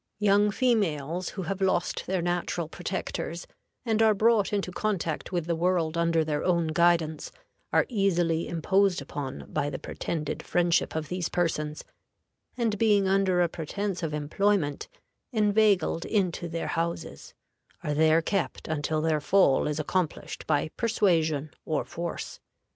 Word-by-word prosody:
Young 205 0 +4
females 185 - 0
who 190 - -2
have 195 +3 -4
lost 185 -2 0
their 185 -2 0
natural 175 -1 -1
protectors, 175 0 -4 0.4
and 220 -1 +1
are 220 -1 +5
brought 215 -1 +3
into 200 -3 -1
contact 180 -5 -2
with 175 -3 -1
the 170 0 0
world 170 -1 +1
under 170 -1 +2
their 150 -1 -1
own 170 -3 +1
guidance, 165 -2 +2 0.4
are - - +4
easily 175 -7 +1
imposed 190 +3 +2
upon 140 -1 -6
by 145 - 0
the 135 - -4
pretended 150 +1 -4
friendship 175 -2 +1
of 155 -2 -3
these 180 -2 -2
persons, 155 -3 -1 0.7
and 225 -4 0
being 205 -3 +4
under 190 -2 +3
a - - +2
pretense 180 +4 -4
of 160 -2 -2
employment 150 +1 0 0.4
inveigled 210 -6 +2
into 180 -5 -1
their 165 0 -3
houses, 165 - -4 0.5
are 150 - -1
there 160 +2 +4
kept 195 +1 -2
until 155 0 -1
their 155 -1 +1
fall 185 -5 +3
is 150 0 -2
accomplished 170 +1 -2
by 150 0 +1
persuasion 165 - +1
or 155 - -1
force. 170 0 -5
175 Hz, 140 wpm, -27 LUFS, 160-195 Hz, 0.7 s, are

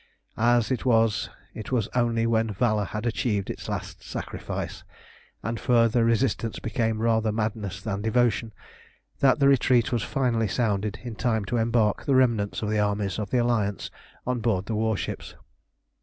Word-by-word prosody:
As 120 0 +3
it 130 - -1
was, 115 -4 +2 0.2
it 110 - -8
was 115 -5 +1
only 115 -2 +1
when 115 -1 +1
valour 105 0 +1
had 105 +4 -5
achieved 105 -4 -1
its - - -8
last - - -5
sacrifice, - - -5 0.6
and 115 0 -3
further 115 -2 +3
resistance 115 -1 +1
became 110 0 -1
rather 110 -1 +2
madness 105 -2 -3
than 100 -2 -3
devotion, 115 0 +1 0.7
that 135 -1 +4
the 140 -2 +4
retreat 130 -3 +3
was 120 -3 +1
finally 125 -3 0
sounded 105 -2 -1
in 120 -2 -5
time 110 -2 0
to 120 +5 -1
embark 115 -2 +1
the 140 - +2
remnants 115 -6 +2
of 105 - -1
the 110 - +1
armies 100 -1 0
of 105 -2 -3
the 125 - +1
Alliance 115 -5 0 0.3
on 125 0 -1
board 110 -5 0
the 115 - -3
warships. 110 -1 -2
115 Hz, 160 wpm, -26 LUFS, 105-120 Hz, 0.7 s, that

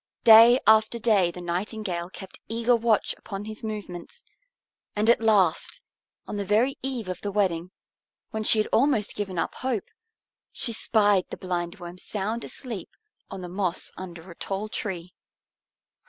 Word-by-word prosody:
Day 230 +2 +9
after 220 +2 +5
day 210 -6 +3
the 180 +1 -8
Nightingale 175 0 -3
kept 190 0 -10
eager 230 +2 +2
watch 225 -2 +1
upon 200 -1 -7
his 215 +1 -7
movements, 210 - -7 0.7
and 210 +1 +1
at 235 - +2
last, 200 -7 +2 0.5
on 205 - -5
the 200 - -1
very 220 +7 +2
eve 255 -6 -3
of 185 - -5
the 205 - -3
wedding, 185 -4 0 0.6
when 220 -2 -3
she 220 - +6
had 215 - +1
almost 240 -4 +2
given 195 -3 -4
up 165 - -1
hope, 255 -5 -3 0.6
she 240 -3 -2
spied 205 -4 +2
the - - -6
Blindworm 175 0 -5
sound 215 +5 -3
asleep 230 -9 -7 0.4
on 195 -1 -7
the 180 - -6
moss 185 -1 -2
under 175 -1 -9
a - - -12
tall 200 +4 -4
tree. 180 -5 -5
205 Hz, 155 wpm, -26 LUFS, 185-225 Hz, 0.7 s, Day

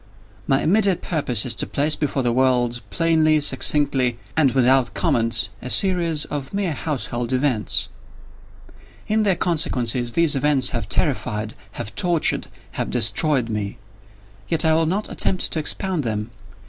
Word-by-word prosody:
My 135 0 +2
immediate 195 +1 +2
purpose 130 - -1
is 125 - 0
to - - -4
place 150 +2 0
before 140 -2 -2
the 120 - +1
world, 125 -2 +1
plainly, 155 +5 +2
succinctly, 140 -4 +1 0.2
and 145 -5 +3
without 130 0 +2
comment, 115 +1 0
a 125 - -6
series 170 -3 +3
of 145 +4 -5
mere 195 -5 -1
household 125 -5 -3
events. 130 -5 0 1.2
In 215 +1 +1
their 200 -3 +2
consequences, 125 -9 0
these 165 -3 +2
events 140 -1 +2
have - - -4
terrified—have 105 -1 -2
tortured—have 170 - 0
destroyed 125 +3 +1
me. 105 -3 -4 0.7
Yet 165 -1 +1
I 160 - +4
will 160 0 +2
not 200 +6 -2
attempt 185 - 0
to 160 - -2
expound 180 +2 -2
them. 110 -2 -4
140 Hz, 135 wpm, -21 LUFS, 120-160 Hz, 1.2 s, I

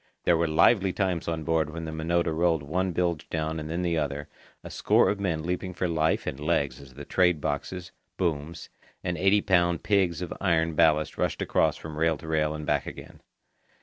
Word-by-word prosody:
There 85 - +4
were 85 0 +1
lively 95 +5 +4
times 90 -2 -1
on 80 -1 -2
board 80 -1 +1
when 80 +1 -6
the 80 - -5
Minota 80 +1 0
rolled 80 -2 +2
one 90 +6 -1
bilge 85 -2 -1
down 80 0 -2
and 75 0 -6
then 85 +2 -2
the 85 -2 +1
other, 75 -1 -3 0.4
a - - -9
score - - +3
of 100 - -4
men 85 -6 -1
leaping 90 +1 -3
for 90 - -1
life 80 -1 +1
and 65 - -4
legs 70 -4 0
as 65 -2 -15
the 75 +1 -8
trade 90 -2 +2
boxes, 85 +5 -4 0.3
booms, 80 -2 -3 0.3
and 90 -1 -1
eighty 95 +3 +3
pound 85 -4 +2
pigs 90 -5 +1
of 90 - -5
iron 85 -3 +2
ballast 75 -1 +2
rushed - - 0
across - - +1
from 75 -1 -8
rail 80 -1 +2
to 80 - -11
rail 75 -1 0
and 75 0 -6
back 75 -2 0
again. - - -10
80 Hz, 205 wpm, -27 LUFS, 75-90 Hz, 0.4 s, There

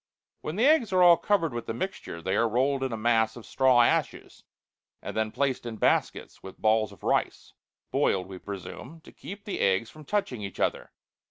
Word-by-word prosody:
When 155 - -5
the 225 +5 +2
eggs 285 -8 +4
are 185 -1 +4
all 175 -1 +8
covered 170 -4 0
with 120 -1 -5
the 115 - -3
mixture, 120 - -5
they 95 +2 -1
are 115 +1 +2
rolled 135 +4 +1
in 130 -1 -2
a 115 - -3
mass 110 0 +2
of 120 - -11
straw 130 +1 +4
ashes, - - -1 0.6
and - - -7
then 110 0 0
placed 135 0 -1
in 120 -2 -6
baskets - - 0
with 95 - -11
balls 110 -1 +2
of 100 - -17
rice - - -1 0.4
boiled, 95 -1 +1
we 95 0 -9
presume 100 - -9
to - - -15
keep 200 +2 -10
the 205 - -4
eggs 95 +4 +1
from 155 - -13
touching 145 - -2
each 100 -2 -7
other. - - -1
120 Hz, 200 wpm, -27 LUFS, 110-165 Hz, 0.6 s, all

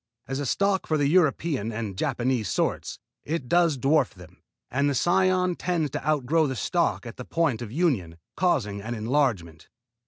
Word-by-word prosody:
As 135 +1 -3
a 145 - -2
stock 195 +6 +1
for 155 - +1
the 145 - +1
European 150 - +1
and 110 -3 -4
Japanese 125 -2 -1
sorts, - - -1 0.3
it 150 -4 -3
does 170 0 +3
dwarf 135 -2 +2
them, 90 -3 -15 0.3
and 140 +3 +1
the 140 - -1
cion 185 +4 +2
tends 170 -6 -1
to - - -4
outgrow 155 +2 +2
the 130 - -3
stock 170 +2 0
at 115 - -8
the 125 - -6
point 150 -5 0
of 115 -3 -6
union, 120 - 0 0.2
causing 120 - 0
an 120 +3 -4
enlargement. 110 - -1
140 Hz, 175 wpm, -26 LUFS, 115-165 Hz, 0.3 s, does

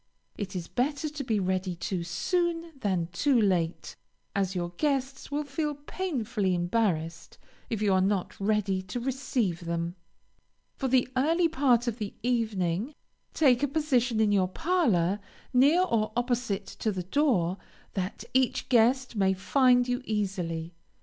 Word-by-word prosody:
It 195 -2 -5
is 175 -2 -4
better 285 +4 -1
to 295 -1 -5
be 220 -4 0
ready 185 -1 -1
too 175 +1 -3
soon, 340 - -1
than 185 -7 -1
too 265 +6 +3
late, 180 -5 0 0.4
as 195 -1 0
your 175 -1 -2
guests 270 -2 -1
will 290 +1 -1
feel 295 +1 -2
painfully 245 - -2
embarrassed 175 -3 -1 0.3
if 220 -2 -2
you 200 -2 +3
are 185 - +4
not 195 -1 -1
ready 200 -2 +1
to 185 +6 -5
receive 240 -9 -1
them. 170 0 -2 0.8
For 270 - -2
the 255 -1 +3
early 325 +6 +3
part 265 -7 +2
of 235 0 -2
the 210 -2 -5
evening, 220 - 0 0.4
take 260 -5 +4
a 285 - +2
position 260 -6 +1
in 215 -2 +3
your 190 -2 +3
parlor, 205 - +1 0.3
near 285 +8 +5
or 225 -11 0
opposite 240 -5 -1
to 220 - -3
the 185 -2 -3
door, 195 - +1 0.4
that 190 +1 -3
each 260 0 +1
guest 250 +1 +3
may 190 -2 +2
find 250 +4 +3
you 245 +1 -1
easily. 180 -6 -2
220 Hz, 150 wpm, -28 LUFS, 185-265 Hz, 0.8 s, near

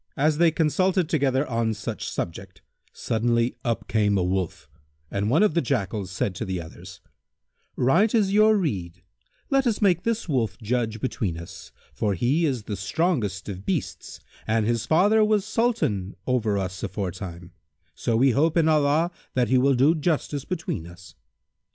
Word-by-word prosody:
As 150 +2 +2
they 170 -1 +6
consulted 170 +3 +1
together 140 -2 +1
on 115 -2 -1
such 105 - -5
subject, 90 0 -6 0.3
suddenly 115 +1 0
up 115 -2 -2
came 105 -2 +2
a 90 - +1
Wolf, 90 -3 -2 0.4
and 100 +1 -1
one 155 - +4
of 210 - +3
the 170 - +2
Jackals 105 - -2
said 95 +1 -2
to 90 - -5
the 95 -1 -3
others, 80 -1 -11 0.7
"Right 170 - +3
is 200 -3 +2
your 215 +1 +5
rede; 90 - -3 0.5
let 270 -1 +3
us 220 -3 0
make 185 -5 +3
this 230 +1 -2
Wolf 120 - -1
judge 110 -1 -2
between 105 -10 -2
us, 85 0 -10 0.2
for 100 -2 -1
he 140 - +1
is 130 -6 -2
the 105 - -4
strongest 100 - -1
of 95 -2 -6
beasts - - -4 0.3
and 110 -1 +1
his 115 +1 -1
father 205 +7 +4
was 210 -2 +2
Sultan 110 - 0
over 115 -5 +1
us 95 -1 -4
aforetime; 90 -2 -5 0.4
so 115 -2 -1
we 130 +3 +4
hope 155 +6 +2
in 160 -1 +4
Allah 155 +2 +2 0.2
that 125 -2 +2
he 130 0 +4
will 135 +1 +3
do 135 +6 +4
justice 150 -3 -1
between 160 - -4
us." 90 +2 -14
120 Hz, 165 wpm, -25 LUFS, 100-160 Hz, 0.7 s, they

